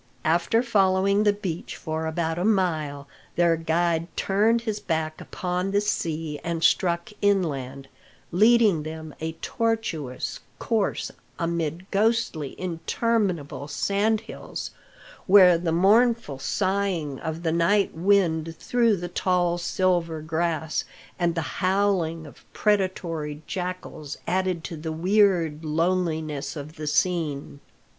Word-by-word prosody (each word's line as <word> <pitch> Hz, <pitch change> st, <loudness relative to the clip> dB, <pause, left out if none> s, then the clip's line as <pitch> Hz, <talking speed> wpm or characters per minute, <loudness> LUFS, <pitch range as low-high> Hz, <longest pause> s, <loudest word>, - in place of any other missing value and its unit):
After 170 Hz, +8 st, +2 dB
following 200 Hz, -2 st, +3 dB
the 205 Hz, -, +6 dB
beach 190 Hz, -5 st, -5 dB
for 160 Hz, 0 st, -3 dB
about 160 Hz, +1 st, -1 dB
a -, -, 0 dB
mile, 160 Hz, -9 st, 0 dB, 0.3 s
their 170 Hz, -1 st, +4 dB
guide 165 Hz, +1 st, 0 dB
turned 220 Hz, +4 st, +2 dB
his 220 Hz, -3 st, -3 dB
back 160 Hz, -5 st, -2 dB
upon 180 Hz, +1 st, -3 dB
the 200 Hz, +1 st, +2 dB
sea 165 Hz, -7 st, -2 dB
and 165 Hz, -1 st, -2 dB
struck 170 Hz, +2 st, +2 dB
inland, 140 Hz, -9 st, 0 dB, 0.4 s
leading 215 Hz, -2 st, +5 dB
them 155 Hz, 0 st, -7 dB
a 160 Hz, +1 st, -3 dB
tortuous 220 Hz, -, -2 dB, 0.2 s
course 220 Hz, -4 st, -1 dB, 0.3 s
amid 170 Hz, 0 st, -2 dB
ghostly, 210 Hz, -, 0 dB
interminable 175 Hz, -, -1 dB
sand 205 Hz, +8 st, +1 dB
hills, -, -, -7 dB, 0.6 s
where 185 Hz, -2 st, +8 dB
the 165 Hz, 0 st, -1 dB
mournful 205 Hz, -, +3 dB
sighing 185 Hz, -4 st, -1 dB
of 160 Hz, +1 st, -5 dB
the 165 Hz, -, +1 dB
night 170 Hz, +5 st, +2 dB
wind 165 Hz, -3 st, +1 dB
through 235 Hz, -4 st, +2 dB
the 175 Hz, 0 st, -4 dB
tall 175 Hz, -1 st, +1 dB
silver 175 Hz, -2 st, 0 dB
grass, 160 Hz, 0 st, -1 dB, 0.4 s
and 170 Hz, -1 st, +1 dB
the 165 Hz, -, 0 dB, 0.2 s
howling 185 Hz, -4 st, +1 dB
of 145 Hz, -, -14 dB
predatory 170 Hz, -7 st, -1 dB
jackals, 180 Hz, -5 st, -5 dB
added 185 Hz, -2 st, 0 dB
to 170 Hz, -, -5 dB
the 160 Hz, +1 st, -4 dB
weird 175 Hz, -3 st, +2 dB
loneliness 160 Hz, -2 st, -1 dB
of 150 Hz, +2 st, -8 dB
the 155 Hz, 0 st, -5 dB
scene. 150 Hz, -4 st, 0 dB
170 Hz, 120 wpm, -25 LUFS, 160-195 Hz, 0.6 s, where